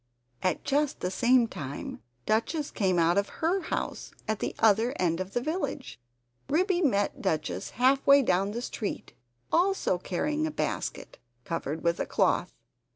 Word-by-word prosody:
And 185 Hz, -, +1 dB
just 290 Hz, +1 st, +1 dB
at -, -, -33 dB
the 180 Hz, -, -1 dB
same 240 Hz, +3 st, +4 dB
time, 145 Hz, -10 st, -6 dB, 0.2 s
Duchess 285 Hz, +8 st, 0 dB
came 185 Hz, -3 st, +1 dB
out 170 Hz, +3 st, +4 dB
of 200 Hz, -, -2 dB
HER 345 Hz, +4 st, 0 dB
house, 320 Hz, -, -3 dB, 0.2 s
at 220 Hz, -1 st, -1 dB
the -, -, -3 dB
other 225 Hz, +4 st, +3 dB
end 170 Hz, -2 st, +1 dB
of 185 Hz, +1 st, -5 dB
the 245 Hz, -, 0 dB
village. 305 Hz, -, -3 dB, 0.5 s
Ribby 360 Hz, +4 st, +2 dB
met 205 Hz, -, +1 dB
Duchess 160 Hz, -5 st, -2 dB
half 265 Hz, +3 st, +3 dB
way 280 Hz, 0 st, +7 dB
down 190 Hz, -2 st, +2 dB
the 235 Hz, +4 st, -4 dB
street, 210 Hz, -, -5 dB, 0.4 s
also 355 Hz, -, +2 dB
carrying 300 Hz, -, -1 dB
a -, -, -3 dB
basket, -, -, -4 dB, 0.2 s
covered 160 Hz, 0 st, -4 dB
with 170 Hz, 0 st, +1 dB
a -, -, -1 dB
cloth. -, -, +1 dB
225 Hz, 160 wpm, -28 LUFS, 185-295 Hz, 0.5 s, way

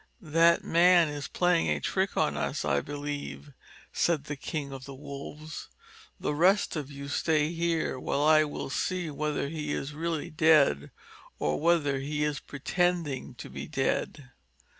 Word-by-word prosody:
"That 170 Hz, +1 st, +5 dB
man 175 Hz, -1 st, +5 dB
is 145 Hz, -1 st, -5 dB
playing 175 Hz, -, +2 dB
a 75 Hz, -1 st, +1 dB
trick -, -, -1 dB
on -, -, +2 dB
us, -, -, -2 dB
I 70 Hz, -, +2 dB
believe," 145 Hz, -, -6 dB, 0.4 s
said 165 Hz, -5 st, +1 dB
the 145 Hz, 0 st, -5 dB
King 140 Hz, -1 st, -5 dB
of 135 Hz, -1 st, -8 dB
the 140 Hz, -, -9 dB
Wolves. 145 Hz, +2 st, -8 dB, 0.5 s
"The -, -, -1 dB
rest 185 Hz, +7 st, +3 dB
of 145 Hz, -3 st, -4 dB
you 140 Hz, 0 st, -8 dB
stay 150 Hz, +1 st, +1 dB
here 165 Hz, -5 st, 0 dB
while 140 Hz, -, -1 dB
I 155 Hz, 0 st, +6 dB
will 145 Hz, -2 st, -5 dB
see 180 Hz, -1 st, -1 dB
whether 150 Hz, 0 st, -2 dB
he 150 Hz, -1 st, -4 dB
is 140 Hz, +2 st, -4 dB
really 165 Hz, 0 st, -3 dB
dead, 150 Hz, -, +4 dB, 0.5 s
or 75 Hz, -, 0 dB
whether 150 Hz, -4 st, +2 dB
he 150 Hz, +2 st, -2 dB
is 150 Hz, -1 st, -1 dB
pretending 165 Hz, -1 st, -1 dB
to -, -, -8 dB
be 70 Hz, +2 st, -7 dB
dead." 135 Hz, 0 st, -2 dB
150 Hz, 160 wpm, -29 LUFS, 140-165 Hz, 0.5 s, I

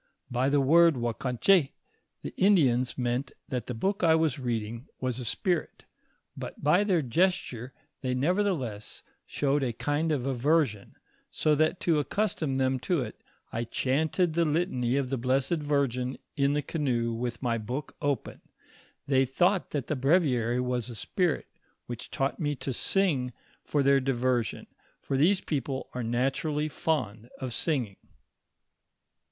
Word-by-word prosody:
By 125 Hz, +2 st, +1 dB
the 145 Hz, 0 st, +3 dB
word 165 Hz, +4 st, +5 dB
Ouakanch^, 125 Hz, -, +2 dB, 0.5 s
the -, -, -5 dB
Indians 135 Hz, -11 st, +3 dB
meant 125 Hz, +2 st, -1 dB, 0.2 s
that 125 Hz, -4 st, -3 dB
the 125 Hz, -, -4 dB
book 195 Hz, -, -1 dB
I 160 Hz, -1 st, +6 dB
was 160 Hz, -4 st, +1 dB
reading 115 Hz, -1 st, -3 dB
was 130 Hz, -1 st, -2 dB
a -, -, -4 dB
spirit; 175 Hz, -, -1 dB, 0.5 s
bat -, -, -6 dB
by 175 Hz, +7 st, +4 dB
their 185 Hz, -6 st, +2 dB
gesture 130 Hz, -4 st, 0 dB, 0.3 s
they 130 Hz, -2 st, -1 dB
nevertheless 140 Hz, -, -1 dB, 0.2 s
showed 145 Hz, 0 st, 0 dB
a 130 Hz, -3 st, 0 dB
kind 145 Hz, +6 st, -1 dB
of 135 Hz, -5 st, 0 dB
aversion, 135 Hz, -4 st, +1 dB, 0.3 s
so 155 Hz, -, +1 dB
that 155 Hz, +4 st, +2 dB
to 155 Hz, -4 st, +2 dB
accastom 155 Hz, -4 st, -1 dB
them 130 Hz, 0 st, +1 dB
to 170 Hz, +3 st, 0 dB
it, 110 Hz, -, -9 dB, 0.3 s
I 115 Hz, -, -1 dB
chanted 155 Hz, +8 st, 0 dB
the 170 Hz, +1 st, +2 dB
litany 145 Hz, -6 st, 0 dB
of 135 Hz, -2 st, -1 dB
the 135 Hz, -, -1 dB
Blessed 135 Hz, +6 st, +1 dB
Virgin 135 Hz, -3 st, 0 dB, 0.2 s
in 140 Hz, -1 st, +2 dB
the 150 Hz, 0 st, 0 dB
canoe 120 Hz, -8 st, -1 dB
with 120 Hz, +1 st, -3 dB
ray 115 Hz, -2 st, 0 dB
book 125 Hz, +7 st, -5 dB
open. 145 Hz, -2 st, -2 dB, 0.6 s
They 135 Hz, -1 st, +3 dB
thought 175 Hz, +9 st, +1 dB
that 140 Hz, -4 st, -2 dB
the 155 Hz, -, -2 dB
breviary 130 Hz, -5 st, +2 dB
was 125 Hz, -1 st, -1 dB
a 120 Hz, -, -7 dB
spirit 175 Hz, -, 0 dB, 0.4 s
which 120 Hz, -2 st, -7 dB
taught 135 Hz, 0 st, -1 dB
mo 145 Hz, -3 st, 0 dB
to 135 Hz, 0 st, -4 dB
sing 140 Hz, -6 st, +1 dB, 0.3 s
for 145 Hz, -2 st, 0 dB
their 140 Hz, 0 st, +5 dB
diversion, 130 Hz, -3 st, 0 dB, 0.3 s
for 135 Hz, -, -3 dB
these 180 Hz, +8 st, +4 dB
people 135 Hz, -3 st, -3 dB
are 125 Hz, -, -3 dB
naturally 135 Hz, +6 st, 0 dB
fond 125 Hz, -8 st, -2 dB
of 130 Hz, -3 st, -4 dB
singing. 125 Hz, -, -1 dB
135 Hz, 150 wpm, -28 LUFS, 125-155 Hz, 0.6 s, I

